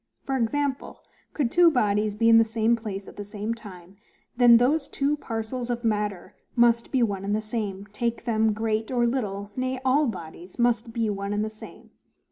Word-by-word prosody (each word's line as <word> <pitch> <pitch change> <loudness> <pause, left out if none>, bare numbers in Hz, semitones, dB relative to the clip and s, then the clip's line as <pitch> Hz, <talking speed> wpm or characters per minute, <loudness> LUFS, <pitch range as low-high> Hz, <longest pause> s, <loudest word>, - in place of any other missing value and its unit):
For 270 - -1
example: 270 +3 -2 0.3
could 265 -6 0
two 350 -1 +6
bodies 210 -6 +1
be 230 +2 +2
in 225 0 +8
the - - +6
same 225 +1 +1
place 205 -4 -6
at - - -12
the 205 - -5
same 205 +2 -4
time; 190 -4 -12 0.4
then 240 -1 +7
those 275 +6 +2
two 280 +2 0
parcels 235 -1 -5
of 240 0 -2
matter 210 -4 -2 0.2
must 235 -1 +3
be 260 -3 +2
one 200 -4 -1
and 205 +1 0
the - - 0
same, 210 -3 -4
take 235 +2 -2
them 220 -2 +2
great 220 0 -1
or 245 -2 +1
little; 205 -5 -2
nay, 255 0 -2
all 280 +3 +3
bodies 175 -3 -8
must 235 -1 +1
be 225 -1 -1
one 200 0 -3
and 210 +1 0
the 215 - -5
same. 215 - -13
225 Hz, 195 wpm, -25 LUFS, 210-245 Hz, 0.4 s, in